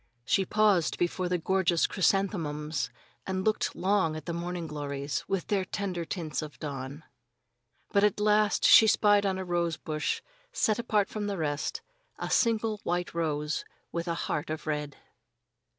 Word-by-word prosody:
She 190 Hz, +8 st, +2 dB
paused 205 Hz, -5 st, +3 dB
before 180 Hz, +1 st, -1 dB
the 180 Hz, -, +1 dB
gorgeous 175 Hz, -1 st, +2 dB
chrysanthemums 160 Hz, -6 st, 0 dB, 0.4 s
and 190 Hz, 0 st, -2 dB
looked 215 Hz, 0 st, +1 dB
long 185 Hz, -5 st, +1 dB
at 155 Hz, -, -7 dB
the 170 Hz, -, -3 dB
morning 175 Hz, 0 st, -3 dB
glories, 140 Hz, -3 st, -3 dB
with 195 Hz, -2 st, -1 dB
their 200 Hz, -2 st, +1 dB
tender 180 Hz, -2 st, -3 dB
tints 165 Hz, -3 st, -3 dB
of 150 Hz, -1 st, -8 dB
dawn. 140 Hz, 0 st, -6 dB, 0.9 s
But 200 Hz, -1 st, +3 dB
at 210 Hz, -1 st, +3 dB
last 210 Hz, 0 st, +3 dB
she 220 Hz, -, +9 dB
spied 205 Hz, -1 st, +4 dB
on 190 Hz, -1 st, 0 dB
a 190 Hz, -, -4 dB
rose 170 Hz, -2 st, 0 dB
bush, 155 Hz, -1 st, -2 dB, 0.3 s
set 215 Hz, +1 st, +1 dB
apart 210 Hz, -4 st, +1 dB
from 210 Hz, -1 st, -4 dB
the 200 Hz, -1 st, -2 dB
rest, 155 Hz, -, -2 dB, 0.4 s
a -, -, -4 dB
single 225 Hz, -2 st, +2 dB
white 175 Hz, 0 st, -1 dB
rose 150 Hz, -2 st, -1 dB, 0.3 s
with 170 Hz, +1 st, -3 dB
a 170 Hz, -, 0 dB
heart 150 Hz, -, -2 dB
of 155 Hz, 0 st, -4 dB
red. 150 Hz, -2 st, -3 dB
175 Hz, 160 wpm, -29 LUFS, 155-200 Hz, 0.9 s, she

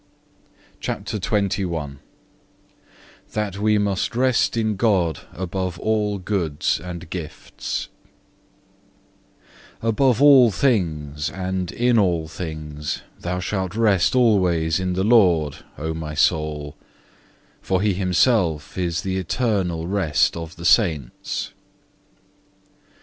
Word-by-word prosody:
CHAPTER 105 Hz, -, -4 dB
XXI 90 Hz, -8 st, -1 dB, 1.4 s
That 105 Hz, -2 st, -2 dB
we 105 Hz, 0 st, +3 dB
must 100 Hz, +2 st, -1 dB
rest 125 Hz, -1 st, +2 dB
in 110 Hz, -2 st, 0 dB
God 95 Hz, -7 st, +1 dB
above 95 Hz, -1 st, -4 dB
all 105 Hz, +1 st, 0 dB
goods 90 Hz, -6 st, -1 dB
and 90 Hz, 0 st, -7 dB
gifts 85 Hz, -5 st, -5 dB, 1.9 s
Above 115 Hz, +2 st, +2 dB
all 135 Hz, -4 st, +7 dB
things 80 Hz, -, 0 dB
and 95 Hz, -1 st, -3 dB
in 120 Hz, -1 st, +2 dB
all 85 Hz, -5 st, +1 dB
things 75 Hz, -3 st, -5 dB, 0.2 s
thou 90 Hz, +1 st, -3 dB
shalt 95 Hz, 0 st, -3 dB
rest 105 Hz, -2 st, +3 dB
alway 90 Hz, -9 st, +3 dB
in 90 Hz, -1 st, -1 dB
the 95 Hz, +1 st, 0 dB
Lord, 90 Hz, -10 st, +4 dB, 0.2 s
O 80 Hz, +2 st, -3 dB
my 80 Hz, -1 st, -5 dB
soul, 75 Hz, -2 st, 0 dB, 0.9 s
for 95 Hz, -1 st, 0 dB
he 105 Hz, -2 st, +2 dB
himself 90 Hz, -, +1 dB
is 85 Hz, -2 st, -1 dB
the 95 Hz, 0 st, -2 dB
eternal 95 Hz, -4 st, -1 dB
rest 90 Hz, -6 st, +1 dB
of 80 Hz, -1 st, -7 dB
the 85 Hz, -, -9 dB
saints. 80 Hz, -, +1 dB
90 Hz, 105 wpm, -22 LUFS, 80-105 Hz, 1.9 s, all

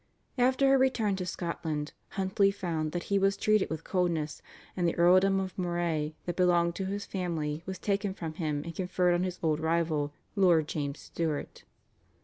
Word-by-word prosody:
After 260 Hz, +2 st, +4 dB
her 270 Hz, 0 st, +5 dB
return 240 Hz, -6 st, +2 dB
to 180 Hz, -1 st, -4 dB
Scotland 160 Hz, -4 st, -3 dB, 0.2 s
Huntly 195 Hz, +1 st, +3 dB
found 165 Hz, -6 st, -2 dB
that 175 Hz, 0 st, -3 dB
he 200 Hz, -, +4 dB
was 195 Hz, +1 st, +2 dB
treated 215 Hz, -1 st, +2 dB
with 160 Hz, 0 st, -4 dB
coldness, 170 Hz, -5 st, -1 dB, 0.3 s
and 175 Hz, -2 st, +1 dB
the 170 Hz, -, 0 dB
earldom 185 Hz, +3 st, +5 dB
of 190 Hz, -1 st, -4 dB
Moray 170 Hz, -4 st, -1 dB
that 175 Hz, -, -3 dB
belonged 175 Hz, -2 st, +3 dB
to 190 Hz, -, -2 dB
his 200 Hz, +1 st, -3 dB
family 165 Hz, -5 st, -3 dB
was 190 Hz, 0 st, -4 dB
taken 200 Hz, +1 st, -1 dB
from 160 Hz, -4 st, -5 dB
him 150 Hz, -3 st, -2 dB
and 170 Hz, +1 st, -6 dB
conferred 180 Hz, 0 st, +1 dB
on 175 Hz, -, +1 dB
his 185 Hz, -1 st, -2 dB
old 155 Hz, -2 st, +2 dB
rival, 160 Hz, -2 st, 0 dB, 0.2 s
Lord 175 Hz, -6 st, +4 dB
James 145 Hz, -2 st, -3 dB
Stuart. 160 Hz, -3 st, -4 dB
175 Hz, 175 wpm, -30 LUFS, 160-190 Hz, 0.3 s, her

